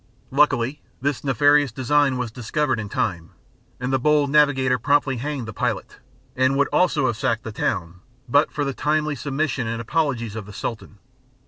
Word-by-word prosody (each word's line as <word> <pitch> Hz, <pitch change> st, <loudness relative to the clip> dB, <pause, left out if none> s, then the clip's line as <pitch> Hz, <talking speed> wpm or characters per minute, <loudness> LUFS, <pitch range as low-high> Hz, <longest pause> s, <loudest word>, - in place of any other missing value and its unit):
Luckily, 135 Hz, -1 st, +2 dB, 0.2 s
this 140 Hz, 0 st, -2 dB
nefarious 145 Hz, 0 st, +3 dB
design 135 Hz, +2 st, +2 dB
was 125 Hz, -3 st, -3 dB
discovered 130 Hz, +2 st, -1 dB
in 105 Hz, -2 st, -5 dB
time, 85 Hz, -6 st, -2 dB, 0.5 s
and 130 Hz, +1 st, -2 dB
the 135 Hz, -, +3 dB
bold 145 Hz, +1 st, +2 dB
navigator 135 Hz, -4 st, +3 dB
promptly 140 Hz, +1 st, +2 dB
hanged 135 Hz, -1 st, -4 dB
the 110 Hz, -, -6 dB
pilot, -, -, -3 dB, 0.4 s
and 130 Hz, +1 st, +2 dB
would 140 Hz, -, +2 dB
also 165 Hz, -6 st, +2 dB
have 120 Hz, -4 st, 0 dB
sacked 115 Hz, +1 st, -1 dB
the 110 Hz, -, -6 dB
town 90 Hz, -4 st, -2 dB, 0.3 s
but 145 Hz, +5 st, +3 dB
for 145 Hz, -, -2 dB
the 140 Hz, -, -2 dB
timely 150 Hz, +2 st, 0 dB
submission 140 Hz, -2 st, -2 dB
and 115 Hz, 0 st, -3 dB
apologies 120 Hz, -4 st, -1 dB
of 105 Hz, -3 st, -6 dB
the 105 Hz, -, -10 dB
Sultan. 105 Hz, 0 st, -6 dB
130 Hz, 175 wpm, -23 LUFS, 115-145 Hz, 0.5 s, nefarious